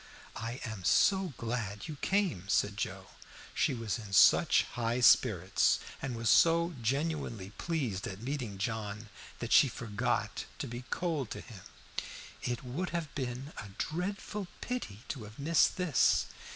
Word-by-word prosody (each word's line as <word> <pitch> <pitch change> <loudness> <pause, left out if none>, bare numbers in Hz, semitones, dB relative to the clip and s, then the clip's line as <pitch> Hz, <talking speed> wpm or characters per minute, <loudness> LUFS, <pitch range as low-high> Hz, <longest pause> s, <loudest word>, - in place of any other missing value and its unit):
"I 115 +3 -4
am 110 -5 -6
so 190 - +3
glad 115 -4 -3
you 155 - -5
came," 180 - 0
said 105 -1 +2
Joe. 95 -2 -4 0.4
She - - +1
was 115 -1 -2
in 105 -3 -9
such - - +6
high 120 +1 -1
spirits 100 -6 +4 0.2
and 130 -3 -3
was 115 0 -3
so 170 +4 +5
genuinely 135 - -1
pleased 130 - -2
at 95 0 -6
meeting 120 -4 -4
John 110 +1 -3 0.3
that 120 - -5
she 145 - +8
forgot 110 -4 -2
to - - -3
be 120 +2 -7
cold 160 -9 -1
to - - -6
him. 110 -7 -11 0.8
"It 120 +1 -3
would 140 +9 -3
have 165 -4 -3
been 130 +2 -4
a 100 - -7
dreadful 195 +3 -3
pity 175 - -4
to 125 -8 -4
have 105 +1 -12
missed 160 +6 +3
this." 180 -8 +3
120 Hz, 150 wpm, -32 LUFS, 105-155 Hz, 0.8 s, she